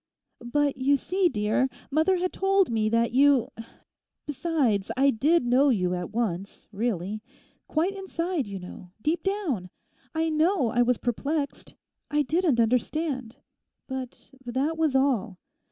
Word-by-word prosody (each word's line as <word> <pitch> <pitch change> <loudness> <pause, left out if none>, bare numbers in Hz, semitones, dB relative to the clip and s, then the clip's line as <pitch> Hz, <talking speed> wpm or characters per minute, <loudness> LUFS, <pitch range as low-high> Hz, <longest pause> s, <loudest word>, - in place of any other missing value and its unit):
'But 285 +3 0
you 275 +2 +3
see, 370 +5 +1
dear, 215 +3 +1 0.2
mother 320 +6 +3
had 365 +1 -2
told 390 -4 +2
me 215 -1 +1
that 230 +1 +2
you—besides, 265 - 0
I 275 +1 +5
did 290 +6 +2
know 260 +4 +4
you 180 -7 +1
at 180 -1 -3
once, 200 -4 -3
really; 210 -1 -2 0.5
quite 345 +6 0
inside, 355 - -2
you 200 -1 -5
know, 180 0 -10
deep 320 +3 +1
down. 345 - -2 0.5
I 320 0 +1
know 315 - +2
I 245 - +2
was 245 0 +3
perplexed; 280 +4 -3 0.3
I 295 0 +2
didn't 310 -2 +1
understand; 255 +1 0 0.5
but 265 -1 -7
that 265 +6 -1
was 315 -4 +1
all. 245 -8 +1
265 Hz, 135 wpm, -26 LUFS, 230-320 Hz, 0.5 s, I